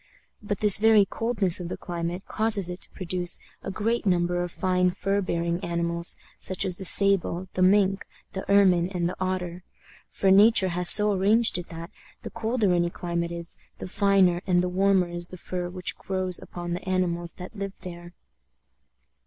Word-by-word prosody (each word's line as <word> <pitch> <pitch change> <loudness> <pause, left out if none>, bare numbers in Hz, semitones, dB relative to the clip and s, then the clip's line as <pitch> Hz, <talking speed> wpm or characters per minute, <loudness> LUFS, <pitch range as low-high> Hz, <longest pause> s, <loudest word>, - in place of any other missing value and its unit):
But 205 -1 -5
this 210 -2 +5
very 215 -2 +4
coldness 215 -6 0
of 175 -1 -7
the - - -6
climate 175 +1 -6
causes 210 -5 +1
it 180 - -9
to - - -7
produce 180 -1 -4 0.2
a - - -7
great 225 +4 -2
number 175 -2 0
of 175 -1 -5
fine 180 0 0
fur 195 +3 -2
bearing 170 0 -3
animals, 170 0 -2 0.2
such 185 +1 -2
as 180 -2 0
the 190 - -8
sable, 190 -1 +3
the 185 - -3
mink, 195 +1 +2 0.3
the 190 - -5
ermine, 185 -4 +3
and 175 -3 -3
the 180 - -5
otter; 180 -1 -4 0.5
for 195 - 0
nature 200 0 +4
has 180 0 +5
so 210 0 +10
arranged 205 +1 +2
it 175 - -9
that, 165 +1 -9 0.3
the - - -8
colder 225 -4 -1
any 175 0 0
climate 170 -1 -5
is, 170 0 -9 0.2
the - - -8
finer 190 -2 +1
and 180 -1 +1
the 180 - -2
warmer 190 0 +1
is 175 0 -5
the 185 - -12
fur 180 0 -6
which 180 0 -4
grows 185 -2 -2
upon 175 0 -8
the 175 +2 -6
animals 175 -2 -2
that 185 +5 -11
live 195 -1 -7
there. 175 -1 -11
185 Hz, 180 wpm, -24 LUFS, 175-195 Hz, 0.5 s, so